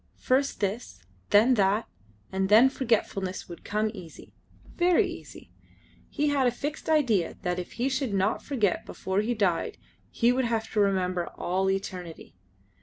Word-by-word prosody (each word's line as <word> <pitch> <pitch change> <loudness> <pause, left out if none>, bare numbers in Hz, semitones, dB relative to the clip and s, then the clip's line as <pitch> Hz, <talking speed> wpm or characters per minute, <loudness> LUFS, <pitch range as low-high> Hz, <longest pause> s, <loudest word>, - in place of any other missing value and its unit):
First 270 0 0
this, 200 - -3 0.3
then 220 +5 +5
that, 200 +3 +1 0.4
and 190 0 -1
then 225 +5 +7
forgetfulness 205 -7 -1
would 170 - -10
come 215 +1 -1
easy. 180 -6 -12 0.4
Very 350 0 +3
easy. - - -10 0.6
He 295 -1 0
had 275 -3 +2
a - - +3
fixed 290 +7 -5
idea 240 - +2
that 180 0 -1
if 180 - -7
he 245 +2 -1
should 265 -3 -1
not 195 +2 0
forget 220 -10 0
before 190 +2 -2
he 235 +3 -1
died 190 -6 0 0.3
he 235 +1 +2
would 255 0 +1
have 225 -1 -2
to 215 - 0
remember 185 -3 +1
to - - -10
all 190 +2 -1
eternity. 185 -3 -5
210 Hz, 160 wpm, -27 LUFS, 190-250 Hz, 0.6 s, then